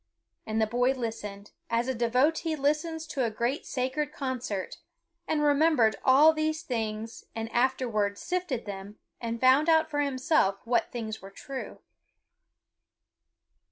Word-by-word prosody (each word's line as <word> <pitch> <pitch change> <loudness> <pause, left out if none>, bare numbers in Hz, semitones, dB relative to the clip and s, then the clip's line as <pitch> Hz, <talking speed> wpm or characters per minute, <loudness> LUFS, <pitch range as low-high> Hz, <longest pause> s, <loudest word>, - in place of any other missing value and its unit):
And 220 0 -1
the 220 - +4
boy 245 +4 +2
listened, 210 -5 -6 0.2
as 235 +1 +1
a 260 - 0
devotee 265 +8 +1
listens 305 +3 -1
to 300 -4 -2
a 230 - +1
great 235 +6 -2
sacred 275 +3 -1
concert, 255 - -4 0.5
and 300 -1 +1
remembered 290 -7 +4
all 290 +5 +7
these 310 0 -1
things 225 -2 -4
and 225 0 -4
afterwards 235 -5 +1
sifted 355 -9 -2
them 200 0 -7 0.2
and 230 0 -3
found 265 +6 +5
out 320 -1 +4
for 290 - -1
himself 260 -7 +1
what 240 +1 +1
things 220 -2 -5
were 195 - -10
true. 265 +6 -8
255 Hz, 135 wpm, -28 LUFS, 225-300 Hz, 0.5 s, all